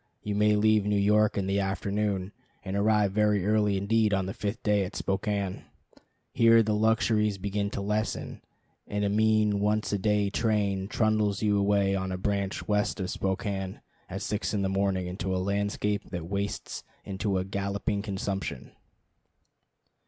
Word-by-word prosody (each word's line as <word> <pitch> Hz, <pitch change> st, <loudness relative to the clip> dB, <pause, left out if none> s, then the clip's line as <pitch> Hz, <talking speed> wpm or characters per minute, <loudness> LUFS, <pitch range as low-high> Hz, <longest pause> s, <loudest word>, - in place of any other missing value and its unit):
You 105 Hz, -, -2 dB
may 105 Hz, +1 st, +3 dB
leave 110 Hz, 0 st, +3 dB
New 105 Hz, +1 st, 0 dB
York 105 Hz, +1 st, +3 dB
in 100 Hz, -, 0 dB
the 100 Hz, +1 st, 0 dB
afternoon, 100 Hz, 0 st, -1 dB, 0.3 s
and 95 Hz, 0 st, -3 dB
arrive 105 Hz, -1 st, +3 dB
very 105 Hz, -2 st, +2 dB
early 105 Hz, -1 st, +2 dB
indeed 105 Hz, +1 st, +2 dB
on 95 Hz, -1 st, -1 dB
the 95 Hz, -, -4 dB
fifth 105 Hz, +1 st, -4 dB
day 105 Hz, -2 st, +2 dB
at 95 Hz, -, -6 dB
Spokane. 100 Hz, -1 st, -2 dB, 0.7 s
Here 115 Hz, 0 st, +6 dB
the 110 Hz, 0 st, 0 dB
luxuries 110 Hz, -1 st, +2 dB
begin 100 Hz, +1 st, -2 dB
to 100 Hz, -, -4 dB
lessen, 105 Hz, +2 st, -2 dB, 0.5 s
and 105 Hz, 0 st, -1 dB
a -, -, +1 dB
mean 110 Hz, -1 st, +2 dB
once 105 Hz, +1 st, 0 dB
a 100 Hz, -, 0 dB
day 105 Hz, 0 st, +1 dB
train 100 Hz, -4 st, 0 dB
trundles 110 Hz, -2 st, +1 dB
you 105 Hz, -1 st, +3 dB
away 100 Hz, -1 st, +2 dB
on 95 Hz, -1 st, -2 dB
a 90 Hz, -, -2 dB
branch 100 Hz, 0 st, -2 dB
west 105 Hz, 0 st, 0 dB
of 95 Hz, -1 st, -2 dB
Spokane 95 Hz, 0 st, -3 dB, 0.3 s
at 95 Hz, +2 st, -5 dB
six 105 Hz, 0 st, -2 dB
in 100 Hz, -, 0 dB
the 95 Hz, -, 0 dB
morning 95 Hz, -1 st, 0 dB
into 95 Hz, +1 st, -3 dB
a -, -, 0 dB
landscape 100 Hz, +2 st, -1 dB
that 85 Hz, -3 st, -5 dB
wastes 100 Hz, +3 st, -4 dB, 0.2 s
into 100 Hz, 0 st, -1 dB
a 95 Hz, -, -1 dB
galloping 100 Hz, +1 st, -2 dB
consumption. 95 Hz, -, -4 dB
100 Hz, 165 wpm, -28 LUFS, 95-105 Hz, 0.7 s, Here